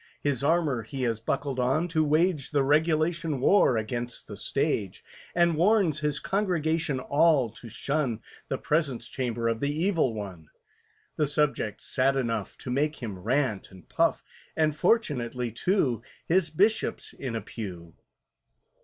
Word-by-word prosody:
His 140 Hz, -3 st, 0 dB
armour 150 Hz, -5 st, +2 dB
he 130 Hz, +4 st, -5 dB
has 115 Hz, -2 st, 0 dB
buckled 130 Hz, +3 st, -2 dB
on, 135 Hz, +7 st, +1 dB
to 160 Hz, -1 st, +2 dB
wage 155 Hz, 0 st, +2 dB
The 145 Hz, -2 st, +2 dB
regulation 155 Hz, +1 st, +1 dB
war 130 Hz, -, +4 dB
against 120 Hz, +2 st, -4 dB
the -, -, -7 dB
Stage; -, -, -2 dB, 0.3 s
And 170 Hz, -1 st, +4 dB
warns 175 Hz, -3 st, +3 dB
his 150 Hz, -1 st, -1 dB
congregation 165 Hz, -7 st, 0 dB
all 140 Hz, -3 st, +3 dB
to 115 Hz, +1 st, -11 dB
shun 135 Hz, -2 st, -2 dB, 0.2 s
"The -, -, -2 dB
Presence 140 Hz, -7 st, -1 dB
Chamber 120 Hz, -3 st, -2 dB
of 115 Hz, -1 st, 0 dB
the 140 Hz, -, 0 dB
Evil 160 Hz, -, +1 dB
One," 95 Hz, -7 st, -7 dB, 0.7 s
The 150 Hz, -, +2 dB
subject's 145 Hz, -7 st, -1 dB
sad 135 Hz, +1 st, +2 dB
enough 115 Hz, -6 st, -2 dB
To 125 Hz, -, -6 dB
make 150 Hz, +4 st, +1 dB
him 110 Hz, -9 st, -6 dB
rant 125 Hz, 0 st, 0 dB
and 95 Hz, -3 st, -16 dB
puff, -, -, +1 dB, 0.3 s
And 155 Hz, -2 st, +2 dB
fortunately, 125 Hz, -, 0 dB
too, 125 Hz, -, +1 dB, 0.2 s
His 175 Hz, 0 st, +2 dB
Bishop's 205 Hz, +8 st, 0 dB
in 125 Hz, -4 st, -5 dB
a 115 Hz, -, -2 dB
pew. 90 Hz, -6 st, -8 dB
140 Hz, 145 wpm, -27 LUFS, 120-160 Hz, 0.7 s, war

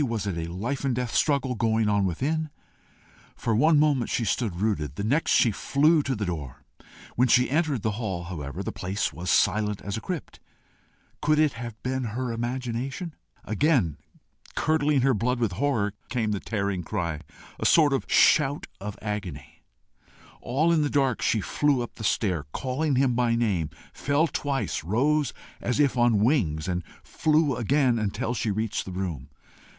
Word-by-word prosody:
Was 115 Hz, -3 st, -2 dB
it 100 Hz, -4 st, -2 dB
a 85 Hz, 0 st, -4 dB
life 115 Hz, +11 st, -3 dB
and 135 Hz, -3 st, +1 dB
death 125 Hz, -1 st, -3 dB
struggle 140 Hz, -4 st, +2 dB
going 110 Hz, -1 st, +1 dB
on 100 Hz, -1 st, +2 dB
within? 150 Hz, -, -1 dB, 0.9 s
For 115 Hz, -2 st, -1 dB
one 155 Hz, +7 st, +4 dB
moment 145 Hz, -5 st, +2 dB
she 115 Hz, -, 0 dB
stood 110 Hz, -4 st, -1 dB
rooted; 85 Hz, -, -1 dB
the 100 Hz, -, -4 dB
next 140 Hz, +9 st, +1 dB
she 115 Hz, -, +5 dB
flew 150 Hz, +9 st, +3 dB
to 135 Hz, -2 st, -2 dB
the 105 Hz, -2 st, -2 dB
door. 75 Hz, -6 st, -5 dB, 0.5 s
When 125 Hz, +2 st, +3 dB
she 125 Hz, +1 st, +4 dB
entered 150 Hz, -, +1 dB
the 110 Hz, -, +1 dB
hall, 95 Hz, -6 st, -3 dB
however, 75 Hz, -6 st, -6 dB
the -, -, -3 dB
place 95 Hz, +3 st, -2 dB
was 90 Hz, +1 st, -5 dB
silent 105 Hz, +5 st, +2 dB
as 100 Hz, +1 st, -3 dB
a -, -, -5 dB
crypt. 180 Hz, -4 st, -6 dB, 0.8 s
Could 155 Hz, +1 st, +3 dB
it 155 Hz, -2 st, +3 dB
have 115 Hz, -2 st, -7 dB
been 130 Hz, 0 st, -1 dB
her 125 Hz, -1 st, -2 dB
imagination? 125 Hz, +6 st, -3 dB, 0.3 s
Again, 110 Hz, -, +1 dB, 0.6 s
curdling 150 Hz, -3 st, +2 dB
her 135 Hz, +1 st, +3 dB
blood 120 Hz, +4 st, 0 dB
with 115 Hz, -5 st, +1 dB
horror, 105 Hz, -2 st, 0 dB, 0.2 s
came 115 Hz, -3 st, -1 dB
the 100 Hz, -, -1 dB
tearing 100 Hz, -4 st, -2 dB
cry, 85 Hz, -5 st, -3 dB, 0.4 s
a -, -, -3 dB
sort 150 Hz, -4 st, +5 dB
of 130 Hz, -7 st, -2 dB
shout 145 Hz, -1 st, +4 dB
of 100 Hz, +1 st, -6 dB
agony. 95 Hz, -, -5 dB, 0.8 s
All 155 Hz, +7 st, +1 dB
in 160 Hz, -, +3 dB
the 145 Hz, -, +1 dB
dark, 135 Hz, -4 st, +1 dB
she 110 Hz, -, +1 dB
flew 140 Hz, +4 st, +1 dB
up 120 Hz, -, -8 dB
the 110 Hz, -, -9 dB
stair, 90 Hz, -, 0 dB
calling 135 Hz, +3 st, -1 dB
him 130 Hz, -1 st, +3 dB
by 120 Hz, -1 st, +2 dB
name, 100 Hz, -10 st, 0 dB, 0.2 s
fell 145 Hz, +3 st, +1 dB
twice, 140 Hz, -, -2 dB
rose 140 Hz, -, +1 dB, 0.3 s
as 125 Hz, +4 st, -1 dB
if 145 Hz, -3 st, +3 dB
on 120 Hz, -4 st, +3 dB
wings, 95 Hz, -, +1 dB
and 90 Hz, -1 st, -1 dB, 0.2 s
flew 155 Hz, -3 st, +1 dB
again 125 Hz, 0 st, +2 dB
until 105 Hz, +2 st, -2 dB
she 115 Hz, -2 st, -1 dB
reached 110 Hz, +1 st, -2 dB
the 95 Hz, -, -7 dB
room. 85 Hz, -8 st, -4 dB
115 Hz, 175 wpm, -26 LUFS, 100-140 Hz, 0.9 s, she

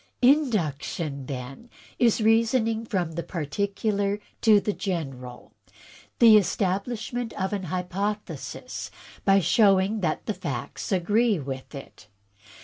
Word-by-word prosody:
"Induction, 170 Hz, -, +1 dB
then, 135 Hz, -, -7 dB, 0.3 s
is 235 Hz, -2 st, +3 dB
reasoning 225 Hz, 0 st, +2 dB
from 180 Hz, -7 st, -1 dB
the 165 Hz, +1 st, -3 dB
particular 200 Hz, +5 st, -2 dB, 0.2 s
to 215 Hz, -2 st, +6 dB
the 210 Hz, +1 st, -2 dB
general; 135 Hz, -, -5 dB, 0.6 s
the 225 Hz, -3 st, +8 dB
establishment 215 Hz, +5 st, -1 dB
of 190 Hz, +2 st, -1 dB
an 195 Hz, -2 st, -3 dB
hypothesis 185 Hz, +4 st, -4 dB, 0.4 s
by 195 Hz, 0 st, +5 dB
showing 195 Hz, +3 st, +3 dB
that 165 Hz, -5 st, -1 dB
the 215 Hz, -, -1 dB
facts 135 Hz, -, -5 dB
agree 205 Hz, +4 st, +2 dB
with 135 Hz, -1 st, -6 dB
it. 135 Hz, -5 st, -11 dB
195 Hz, 110 wpm, -26 LUFS, 165-220 Hz, 0.6 s, the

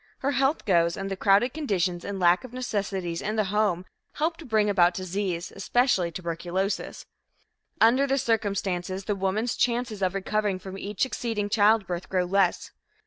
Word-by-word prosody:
Her 275 Hz, -, +1 dB
health 270 Hz, +3 st, +1 dB
goes, 170 Hz, -3 st, +2 dB
and 195 Hz, 0 st, -4 dB
the -, -, -1 dB
crowded 200 Hz, +5 st, +3 dB
conditions 190 Hz, -, -1 dB
and 200 Hz, -1 st, -4 dB
lack 175 Hz, +3 st, +4 dB
of 250 Hz, -2 st, -10 dB
necessities 195 Hz, -8 st, -3 dB
in 215 Hz, +2 st, -2 dB
the 215 Hz, -, +2 dB
home 200 Hz, -4 st, +1 dB, 0.3 s
help 320 Hz, +2 st, -1 dB
to 330 Hz, -, -11 dB
bring 215 Hz, -4 st, +2 dB
about 180 Hz, -3 st, +3 dB
disease 185 Hz, -1 st, -3 dB
especially 195 Hz, -3 st, +1 dB
tuberculosis. 175 Hz, +3 st, -3 dB, 0.7 s
Under 255 Hz, +5 st, +5 dB
the 270 Hz, 0 st, +1 dB
circumstances, 200 Hz, -6 st, -1 dB
the 210 Hz, -, 0 dB
woman's 200 Hz, +4 st, -1 dB
chances 240 Hz, -3 st, -1 dB
of 185 Hz, 0 st, 0 dB
recovering 205 Hz, 0 st, 0 dB
from 190 Hz, 0 st, -9 dB
each 195 Hz, 0 st, -3 dB
succeeding 225 Hz, -5 st, -2 dB
childbirth 205 Hz, -4 st, +2 dB
grow 185 Hz, -1 st, +1 dB
less. 190 Hz, 0 st, +1 dB
200 Hz, 160 wpm, -26 LUFS, 185-225 Hz, 0.7 s, Under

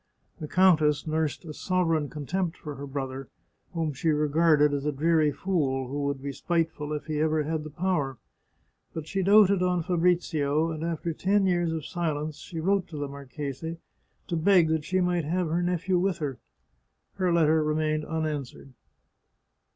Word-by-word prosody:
The 155 Hz, -, -5 dB
countess 155 Hz, -5 st, +4 dB
nursed 155 Hz, 0 st, -1 dB
a 155 Hz, -, -7 dB
sovereign 165 Hz, -4 st, 0 dB
contempt 165 Hz, +4 st, -3 dB
for 150 Hz, -, -7 dB
her 140 Hz, 0 st, -7 dB
brother, 135 Hz, -1 st, -5 dB, 0.5 s
whom 160 Hz, -3 st, -1 dB
she 160 Hz, +5 st, -1 dB
regarded 150 Hz, 0 st, +3 dB
as 140 Hz, -1 st, -1 dB
a 150 Hz, -, 0 dB
dreary 155 Hz, +1 st, +2 dB
fool, 140 Hz, -5 st, -1 dB
who 140 Hz, +1 st, -2 dB
would 140 Hz, -1 st, -2 dB
be 140 Hz, -, -3 dB
spite 165 Hz, +3 st, 0 dB
ful 150 Hz, -2 st, -7 dB
if 150 Hz, -2 st, -3 dB
he 155 Hz, -1 st, -2 dB
ever 155 Hz, 0 st, +2 dB
had 155 Hz, +1 st, -2 dB
the 155 Hz, -, -7 dB
power. 150 Hz, -5 st, -1 dB, 0.8 s
But 160 Hz, -2 st, -4 dB
she 195 Hz, +4 st, -2 dB
doted 200 Hz, 0 st, +5 dB
on 180 Hz, -2 st, +1 dB
Fabrizio, 165 Hz, -3 st, +1 dB
and 155 Hz, 0 st, -5 dB
after 165 Hz, 0 st, -2 dB
ten 195 Hz, +4 st, +2 dB
years 175 Hz, -3 st, +1 dB
of 160 Hz, -2 st, -4 dB
silence 155 Hz, -3 st, -3 dB
she 165 Hz, -, -7 dB
wrote 190 Hz, +2 st, +1 dB
to 155 Hz, -, -8 dB
the 145 Hz, 0 st, -3 dB
marchese, 140 Hz, +3 st, -6 dB, 0.5 s
to 170 Hz, -, -3 dB
beg 170 Hz, 0 st, +4 dB
that 160 Hz, -2 st, 0 dB
she 185 Hz, 0 st, +1 dB
might 175 Hz, -3 st, +1 dB
have 175 Hz, +2 st, -1 dB
her 170 Hz, +2 st, 0 dB
nephew 180 Hz, +1 st, 0 dB
with 190 Hz, 0 st, 0 dB
her. 140 Hz, -5 st, -4 dB, 0.8 s
Her 185 Hz, -2 st, +1 dB
letter 160 Hz, -2 st, +3 dB
remained 155 Hz, 0 st, 0 dB
unanswered. 150 Hz, -4 st, -4 dB
160 Hz, 175 wpm, -27 LUFS, 150-175 Hz, 0.8 s, doted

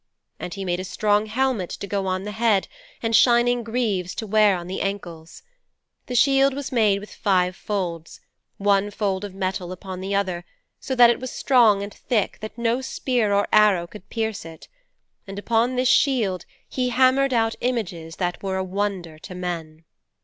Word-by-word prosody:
And 180 Hz, -, -6 dB
he 195 Hz, -1 st, -5 dB
made 175 Hz, -1 st, -1 dB
a -, -, -3 dB
strong 210 Hz, +3 st, +1 dB
helmet 230 Hz, -4 st, 0 dB
to -, -, -6 dB
go 200 Hz, -1 st, -2 dB
on 185 Hz, 0 st, -1 dB
the 210 Hz, -, -5 dB
head 215 Hz, -2 st, +1 dB, 0.4 s
and 225 Hz, 0 st, +1 dB
shining 240 Hz, +1 st, +4 dB
greaves 215 Hz, -6 st, -2 dB
to 220 Hz, -, -4 dB
wear 210 Hz, -2 st, +4 dB
on 175 Hz, -, -7 dB
the 185 Hz, +2 st, -4 dB
ankles. 175 Hz, -5 st, -5 dB, 0.6 s
The 250 Hz, -, -4 dB
shield 270 Hz, +1 st, +4 dB
was 285 Hz, -1 st, -5 dB
made 215 Hz, -5 st, +3 dB
with 210 Hz, -, -11 dB
five 185 Hz, -2 st, +1 dB
folds, 175 Hz, -6 st, -4 dB, 0.4 s
one 200 Hz, 0 st, +2 dB
fold 200 Hz, -2 st, -2 dB
of 200 Hz, -2 st, -7 dB
metal 185 Hz, -2 st, -3 dB
upon 185 Hz, 0 st, -7 dB
the 195 Hz, +1 st, -2 dB
other, 185 Hz, -3 st, -1 dB, 0.4 s
so 265 Hz, -, -3 dB
that 240 Hz, -1 st, +7 dB
it -, -, -2 dB
was 255 Hz, -, -5 dB
so -, -, -7 dB
strong 225 Hz, -7 st, +4 dB
and 200 Hz, 0 st, -7 dB
thick 220 Hz, -6 st, -1 dB
that 215 Hz, +1 st, -7 dB
no 235 Hz, +2 st, 0 dB
spear 245 Hz, -4 st, -1 dB
or 200 Hz, 0 st, +2 dB
arrow 210 Hz, -5 st, +5 dB
could 200 Hz, +2 st, -13 dB
pierce 220 Hz, -3 st, -3 dB
it. 165 Hz, -1 st, -12 dB, 0.6 s
And 195 Hz, 0 st, -8 dB
upon 230 Hz, +4 st, +1 dB
this 255 Hz, 0 st, +1 dB
shield 230 Hz, -, +2 dB, 0.2 s
he 250 Hz, -1 st, -1 dB
hammered 260 Hz, +2 st, +3 dB
out 225 Hz, -2 st, +2 dB
images 180 Hz, -10 st, -3 dB
that 175 Hz, +1 st, -3 dB
were 190 Hz, -1 st, -2 dB
a 190 Hz, -, -1 dB
wonder 185 Hz, -4 st, -3 dB
to 180 Hz, -, -10 dB
men.' 165 Hz, -3 st, -5 dB
205 Hz, 185 wpm, -23 LUFS, 185-235 Hz, 0.6 s, that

